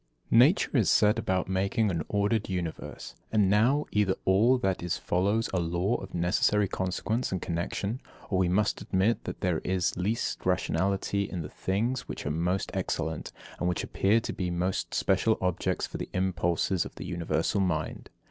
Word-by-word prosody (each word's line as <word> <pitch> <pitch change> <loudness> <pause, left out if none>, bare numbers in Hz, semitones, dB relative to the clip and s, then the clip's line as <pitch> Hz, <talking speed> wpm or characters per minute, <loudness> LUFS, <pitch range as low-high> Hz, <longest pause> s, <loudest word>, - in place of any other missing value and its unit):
75. 115 - +7
Nature 135 - +4
set 105 +3 +4
about 95 -4 0
making 100 +3 +1
an 85 -3 -1
ordered 105 +1 +1
universe; 90 -4 -5 0.2
and 105 -3 +3
now, 125 +8 +3
either 100 -3 +2
all 110 +7 +4
that 95 -7 -1
is 90 -1 -1
follows 100 +5 +1
a 95 - +2
law 85 +5 0
of 95 -1 -9
necessary 100 +4 +2
consequence 95 +7 -2
and 95 - -1
connexion, 95 +8 -3 0.3
or 95 - +2
we 90 -2 +2
must 105 +3 +1
admit 100 +5 +1
that - - -6
there 90 -4 +1
is 90 -1 0
least 105 +6 -2
rationality 100 +3 0
in 90 -3 -4
the - - -7
things 115 +7 -2
which - - -6
are 75 - -1
most 90 +4 -1
excellent, 80 -4 -2 0.3
and 90 - +1
which 90 - -1
appear 105 +4 +2
to 115 - -5
be 90 -5 -2
most 90 +2 -2
special 95 +3 +2
objects 90 0 -1
for - - -7
the - - -5
impulses 90 -1 0
of - - -10
the - - -7
universal 85 +2 0
mind. 80 -5 -2
95 Hz, 175 wpm, -28 LUFS, 90-105 Hz, 0.3 s, 75